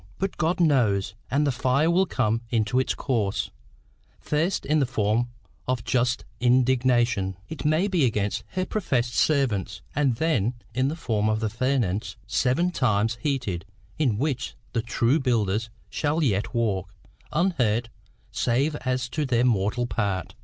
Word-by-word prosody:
But 195 0 -2
God 170 +2 +1
knows, 110 - +2 0.2
and 145 +3 +2
the 140 - +2
fire 130 +5 +2
will 185 +2 +3
come 115 -5 0
in 115 -3 +1
its 130 +1 +2
course 110 -8 -1 0.7
first 160 +4 0
in 150 +3 +2
the 135 - +2
form 115 0 +1 0.4
of 125 -2 -1
just 125 0 0
indignation, 125 -5 +2
it 160 -1 -6
may 155 +6 +3
be, 180 -6 +1
against 105 -1 -1
her 185 0 0
professed 130 - -1
servants, 130 - +1
and 140 -4 +2
then 125 -6 +1 0.2
in 130 +3 +1
the 150 - -2
form 110 -10 0
of 110 0 +1
the 110 -1 -1
furnace 120 -4 0
seven 155 +8 +1
times 115 - +1
heated, 125 - -1 0.4
in 125 -9 +2
which 130 -1 -2 0.2
the 115 - +1
true 120 +4 +1
builders 115 -4 0 0.2
shall 155 +2 0
yet 105 -6 +1
walk 95 -5 -1 0.4
unhurt 125 - +1 0.4
save 135 +6 +1
as 130 -2 -1
to 150 +4 -1
their 125 -3 +2
mortal 110 +1 +1
part. 100 -4 -2
125 Hz, 150 wpm, -25 LUFS, 110-145 Hz, 0.7 s, will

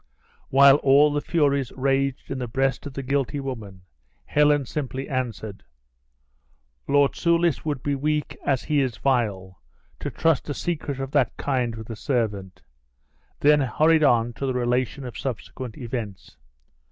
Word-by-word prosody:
While 140 +1 +7
all 145 +1 +4
the 145 - 0
furies 140 -6 +1
raged 135 0 -1
in 135 - -3
the 125 - -3
breast 135 +4 -1
of 140 - -9
the 135 - -4
guilty 140 +1 -1
woman, 110 -9 -7 0.4
Helen 145 -1 +3
simply 135 0 -4
answered, 115 -6 -4 1.2
"Lord 145 0 +4
Soulis 170 -3 +1
would 145 -4 -3
be 145 - 0
weak 150 +2 -1
as 135 -3 0
he 150 -2 +1
is 125 -5 -2
vile, 100 - -1 0.4
to - - -4
trust 165 -3 0
a 145 - -2
secret 150 -5 -3
of 135 0 -4
that 140 -5 +1
kind 125 -5 -1
with 110 +1 -8
a - - -5
servant;" 105 - -2 0.8
then 150 0 +5
hurried 155 +4 +3
on 120 -4 +3
to 135 - -4
the 130 - -1
relation 125 +2 -1
of 125 - -7
subsequent 125 -2 -6
events. 115 -5 -6
135 Hz, 155 wpm, -24 LUFS, 120-145 Hz, 1.2 s, While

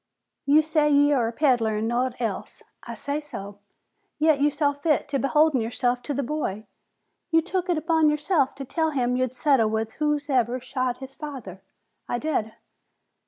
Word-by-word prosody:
"You 300 +2 +6
say 305 -1 +2
ye 290 0 +4
are 245 -5 +2
a - - -2
peddler 235 -5 +2
an' 220 +1 -1
naught 245 +1 -1
else?" 225 -5 -4 0.2
"I - - -8
say 285 +1 -3
so." 205 -9 -9 0.6
"Yet, 305 -2 +3
you 295 - +4
saw 290 0 0
fit 295 +2 0
to 275 -1 0
beholden 295 -1 +3
yourself 245 +2 -1
to 290 - -4
the 280 - -1
boy? 235 -7 -3 0.6
You 325 -1 +4
took 360 +2 -3
it 345 - +2
upon 320 0 +3
yourself 300 -1 +1
to 275 0 -7
tell 320 +4 0
him 250 -4 0
you'd 255 0 -1
settle 250 -4 +3
with 220 0 -2
whosoever 285 -5 +1
shot 255 -1 -2
his 265 0 -10
father?" 260 - -8 0.5
"I 240 - 0
did." 240 -6 -2
275 Hz, 175 wpm, -25 LUFS, 240-300 Hz, 0.6 s, You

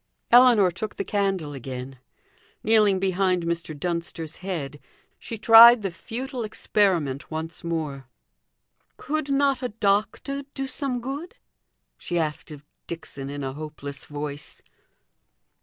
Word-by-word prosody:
Ellinor 240 -6 +7
took 210 +5 -6
the - - -3
candle 195 -7 -1
again; 130 0 -7 0.6
kneeling 215 -3 +4
behind 185 -1 +1
Mr. 170 -3 -3
Dunster's 170 -1 -4
head, 155 -7 -5 0.4
she 230 - -6
tried 225 +1 +9
the 195 - -2
futile 250 +7 -5
experiment 180 -10 0
once 160 +1 -5
more. 155 -5 -3 0.9
"Could 305 0 -3
not 275 -1 +2
a 250 - -2
doctor 215 +6 0
do 270 - -2
some 265 -2 -3
good?" 285 - -6 0.6
she 175 - -3
asked 155 -1 -2
of 150 -1 -11 0.2
Dixon, 145 -5 -7
in 145 0 -5
a 135 0 -3
hopeless 145 -2 -8
voice. 145 0 -7
185 Hz, 125 wpm, -25 LUFS, 150-225 Hz, 0.9 s, tried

